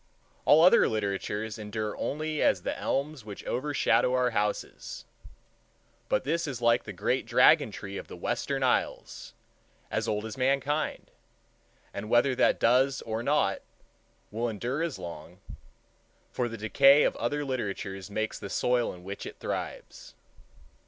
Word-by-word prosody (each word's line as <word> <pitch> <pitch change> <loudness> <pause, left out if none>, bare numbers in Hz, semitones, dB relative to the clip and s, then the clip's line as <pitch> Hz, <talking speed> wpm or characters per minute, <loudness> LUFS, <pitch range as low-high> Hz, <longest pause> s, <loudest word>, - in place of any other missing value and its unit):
All 155 +2 +7
other 185 +7 +6
literatures 105 +1 -3
endure 105 0 -4
only 155 +1 -3
as - - +2
the - - -2
elms 140 -1 -2
which 105 -2 -9
overshadow 130 -1 +1
our 125 -1 +2
houses; 105 -1 -3 1.0
but - - +1
this 165 +4 -1
is 135 -4 -4
like 120 0 +3
the 105 - -6
great 90 - -1
dragon - - +5
tree 100 -1 -7
of - - -7
the - - -9
Western - - -2
Isles, - - -1 0.6
as - - -1
old 105 0 -1
as 110 +4 -7
mankind, 140 +3 0 0.8
and, 105 - -6
whether 120 +3 +4
that 125 - +2
does 130 +3 +3
or 110 0 -3
not, 145 +5 +1 0.7
will 115 +3 -1
endure 120 +7 -3
as 165 -4 -2
long; 85 +1 -9 0.9
for 120 -1 -1
the 115 - -7
decay 135 +7 +5
of - - +1
other 145 +5 -1
literatures 100 -6 -4
makes 110 +2 -3
the 100 - -7
soil 125 +2 +1
in 90 - -14
which 100 +2 -6
it - - -9
thrives. - - -6
120 Hz, 145 wpm, -28 LUFS, 105-140 Hz, 1.0 s, All